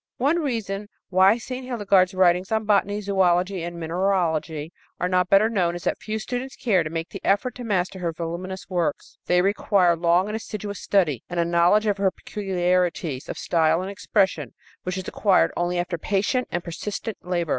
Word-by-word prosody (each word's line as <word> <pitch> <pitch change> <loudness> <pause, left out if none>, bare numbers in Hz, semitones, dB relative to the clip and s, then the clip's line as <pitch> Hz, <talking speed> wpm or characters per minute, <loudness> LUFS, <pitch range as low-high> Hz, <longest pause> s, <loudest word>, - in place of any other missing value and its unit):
One 290 +7 +2
reason 210 - -3 0.2
why 190 +4 +5
St. 255 +2 -6
Hildegard's 200 -6 +2
writings 180 +1 +3
on 220 0 0
botany, 205 0 +2
zoölogy 190 -1 +1
and 170 0 -5
mineralogy 165 -3 -1 0.3
are 180 - 0
not 180 0 +1
better 200 +2 +5
known 180 -6 0
is 175 - -7
that - - -1
few 215 0 -4
students 250 +4 -5
care 200 -7 +2
to 155 - -3
make 165 +1 -4
the 195 - -9
effort 220 +6 +1
to 245 - -8
master 190 -4 -1
her 170 -2 -1
voluminous 175 +3 -5
works. 170 -5 -2
They 180 0 +3
require 195 -3 +3
long 170 +2 +2
and 210 +1 -4
assiduous 210 -2 -5
study 165 - +1
and 175 - -3
a 170 - +2
knowledge 170 +5 +3
of 205 -1 +1
her 195 -1 +3
peculiarities 180 -8 -1
of - - -5
style 165 +1 +2
and 195 - -5
expression 200 -1 0 0.3
which 185 +1 -4
is 185 - -5
acquired 200 -3 +3
only 175 +1 -1
after 175 -1 -2
patient 210 - 0
and 175 0 -2
persistent 205 +5 -5
labor. 175 -2 -2
185 Hz, 185 wpm, -24 LUFS, 175-205 Hz, 0.3 s, why